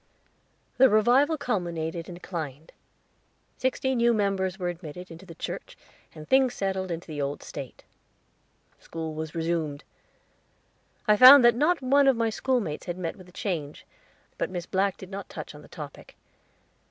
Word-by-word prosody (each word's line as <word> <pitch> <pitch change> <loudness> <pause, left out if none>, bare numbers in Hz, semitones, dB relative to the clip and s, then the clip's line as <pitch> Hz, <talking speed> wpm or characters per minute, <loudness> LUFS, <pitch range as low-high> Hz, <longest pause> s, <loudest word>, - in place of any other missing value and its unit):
The 265 0 +8
revival 250 +9 +4
culminated 170 - -3
and 175 - -7
declined. 160 -4 -7 0.9
Sixty 260 +1 0
new 235 -1 +3
members 195 -3 0
were 180 -3 -2
admitted 175 +1 -8
into 170 +3 -12
the 165 - -10
church, - - -7 0.4
and 155 0 -10
things 260 +3 +3
settled 190 -1 -2
into 170 0 -4
the 150 -3 -5
old 140 +1 -3
state. 135 -4 -9 1.0
School 160 -1 -6
was 155 +1 -6
resumed; 160 -3 -2 1.2
I 210 0 +5
found 255 +2 +10
that 240 - +7
not 300 +5 +1
one 275 +2 +4
of 265 -3 +4
my 230 -1 +1
schoolmates 220 - -2
had 175 0 -3
met 175 -3 -4
with 185 -2 -15
a - - -16
change, 160 -7 -4 0.5
but - - -1
Miss 175 -2 -5
Black 195 0 0
did 190 0 -11
not 195 0 -7
touch 155 - -8
on 150 - -12
the - - -15
topic. 145 -3 -10
185 Hz, 160 wpm, -27 LUFS, 160-235 Hz, 1.2 s, found